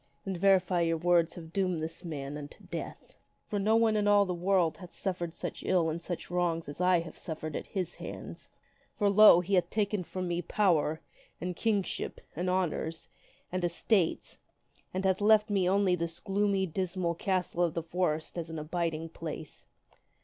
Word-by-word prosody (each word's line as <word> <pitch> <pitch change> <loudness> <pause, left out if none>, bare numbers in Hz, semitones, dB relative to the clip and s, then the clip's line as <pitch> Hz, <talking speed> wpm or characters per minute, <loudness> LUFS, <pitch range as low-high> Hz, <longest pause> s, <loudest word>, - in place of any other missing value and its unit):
Then 195 -1 -2
verily 180 -2 +3
your 165 0 +1
words 170 0 +2
have 165 -1 -10
doomed 185 -5 0
this 165 +3 -6
man 145 -4 -5
unto 145 -1 -9
death. - - -7 0.3
For 205 - -2
no 215 +3 +3
one 225 -1 +4
in 205 -1 +1
all 205 -1 +5
this 180 -2 -2
world 180 -2 +2
hath 180 -2 -10
ever - - -20
suffered 175 -3 -3
such - - -5
ill 170 -4 +2
and 165 +2 -4
such 175 0 -5
wrongs 175 -2 0
as 145 +4 -6
I 180 -1 +4
have 165 - -9
suffered 155 -2 -5
at - - -4
his 185 -4 -3
hands. - - -8 0.5
For, 205 -2 +3
lo! 205 -3 +8
he 190 +3 -4
hath 180 -2 +3
taken 205 -2 0
from 185 +1 -4
me 175 0 -1
power, 165 -4 +1 0.4
and 180 0 -3
kingship, 205 -1 -1 0.2
and 180 +4 -1
honors, 170 -3 -1 0.4
and 185 0 -2
estates, 175 +1 0 0.5
and 190 +1 -2
hath 190 +1 +2
left 215 0 +5
me 190 -3 +2
only 195 -1 +3
this 170 -1 -2
gloomy, 200 -1 +1
dismal 185 0 -2
castle 180 0 -1
of 170 -2 0
the 165 - -1
forest 165 -1 -1
as 165 -1 -5
an 160 - -5
abiding 165 +1 -2
place. 160 -2 -8
180 Hz, 185 wpm, -30 LUFS, 165-195 Hz, 0.5 s, lo